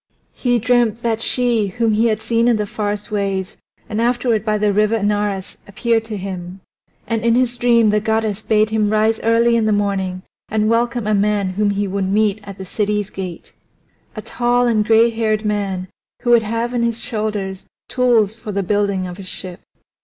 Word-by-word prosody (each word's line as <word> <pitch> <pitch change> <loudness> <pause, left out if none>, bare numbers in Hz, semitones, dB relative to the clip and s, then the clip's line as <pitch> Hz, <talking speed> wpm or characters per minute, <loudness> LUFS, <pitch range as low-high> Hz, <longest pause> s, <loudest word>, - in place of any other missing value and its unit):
He 245 -1 +1
dreamt 235 -1 +1
that 225 -1 0
she 235 -4 +1
whom 225 +3 0
he 225 +2 +3
had 220 -1 -1
seen 230 +1 +1
in 240 - +4
the 210 -1 -1
forest 205 +1 -4
ways 195 -2 -2 0.3
and 220 +1 -2
afterward 240 -2 +1
by 215 -1 0
the 210 -1 +1
River 210 +2 +2
Anaurus 205 -2 -1
appeared 225 +2 0
to 220 -2 -5
him. 185 -1 -6 0.5
And 225 -1 -2
in 230 0 +3
his 245 -1 +1
dream 235 -2 +3
the 210 0 +2
goddess 220 -1 -1
bade 215 0 +2
him 215 -1 +1
rise 220 +1 +2
early 230 +1 +3
in 225 -2 +2
the - - +2
morning 195 -3 -1 0.3
and 215 0 +1
welcome 235 0 +1
a 215 - +1
man 205 -1 +1
whom 205 +2 0
he 200 0 -1
would 195 0 -2
meet 210 0 +2
at 200 -1 -9
the 190 - -7
city's 210 +1 -2
gate 185 -3 -7 0.6
a - - -6
tall 245 0 +1
and 225 -3 +2
gray 225 +2 +4
haired 220 -1 -1
man 200 -3 -2 0.4
who 240 - +2
would 235 -1 +6
have 230 +3 -2
on 240 - 0
his 235 -1 0
shoulders 210 -4 -4 0.2
tools 235 -5 +2
for 220 -1 -8
the 200 0 -1
building 200 -1 0
of 180 +1 -8
a - - -7
ship. 185 -1 -7
215 Hz, 195 wpm, -19 LUFS, 200-230 Hz, 0.6 s, would